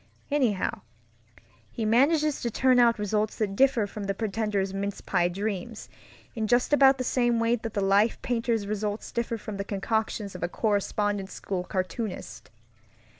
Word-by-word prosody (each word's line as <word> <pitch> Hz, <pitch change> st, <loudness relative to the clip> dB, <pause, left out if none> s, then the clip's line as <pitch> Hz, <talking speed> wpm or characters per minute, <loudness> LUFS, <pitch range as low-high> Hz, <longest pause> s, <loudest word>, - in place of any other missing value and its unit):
Anyhow, 250 Hz, -9 st, 0 dB, 0.9 s
he 225 Hz, -, -4 dB
manages 290 Hz, +6 st, +3 dB
to 240 Hz, -, -1 dB
turn 255 Hz, +2 st, +3 dB
out 235 Hz, -1 st, +5 dB
results 210 Hz, +1 st, -1 dB
that 200 Hz, -3 st, -2 dB
differ 260 Hz, -3 st, +3 dB
from 205 Hz, 0 st, -7 dB
the 195 Hz, 0 st, -2 dB
pretender's 205 Hz, -2 st, -1 dB
mince 200 Hz, 0 st, -3 dB
pie 175 Hz, -2 st, +1 dB
dreams 200 Hz, +3 st, -4 dB, 0.4 s
in 220 Hz, -3 st, -2 dB
just 245 Hz, +5 st, +2 dB
about 270 Hz, -2 st, +6 dB
the 255 Hz, -, -2 dB
same 240 Hz, -2 st, +1 dB
way 230 Hz, +1 st, +2 dB
that 225 Hz, -1 st, -7 dB
the 200 Hz, -, +1 dB
life 200 Hz, +3 st, +3 dB
painter's 230 Hz, -3 st, 0 dB
results 210 Hz, +1 st, -3 dB
differ 235 Hz, -1 st, -2 dB
from 210 Hz, -1 st, -7 dB
the 200 Hz, -, -2 dB
concoctions 205 Hz, +1 st, -2 dB
of 180 Hz, -, -8 dB
a 175 Hz, -, -1 dB
correspondence 205 Hz, -1 st, -1 dB
school 185 Hz, -2 st, -3 dB
cartoonist. 185 Hz, +3 st, -4 dB
215 Hz, 160 wpm, -27 LUFS, 200-235 Hz, 0.9 s, about